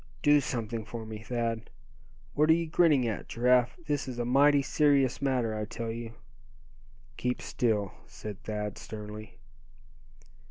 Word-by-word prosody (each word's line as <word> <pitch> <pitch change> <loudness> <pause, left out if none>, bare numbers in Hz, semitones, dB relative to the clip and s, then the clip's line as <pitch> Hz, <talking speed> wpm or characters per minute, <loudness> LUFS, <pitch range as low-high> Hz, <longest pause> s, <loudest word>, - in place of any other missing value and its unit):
Do 145 0 +6
something 115 -3 -3
for 115 +1 -7
me, 110 -1 -7
Thad; 115 -1 -2 0.6
what 150 +2 +3
are - - +9
you 170 0 +1
grinning 155 -6 +3
at, 110 - -3
Giraffe? 125 +1 +3
This 145 -2 -1
is 125 -2 -5
a 120 - -1
mighty 140 +3 +5
serious 140 0 +2
matter, 125 -5 +1
I 105 0 -2
tell 115 +1 -5
you." 115 0 -6 1.0
"Keep 125 0 -1
still!" 105 -5 0 0.2
said 105 -3 -8
Thad, 105 -2 -4
sternly. 105 0 -8
120 Hz, 145 wpm, -29 LUFS, 110-140 Hz, 1.0 s, are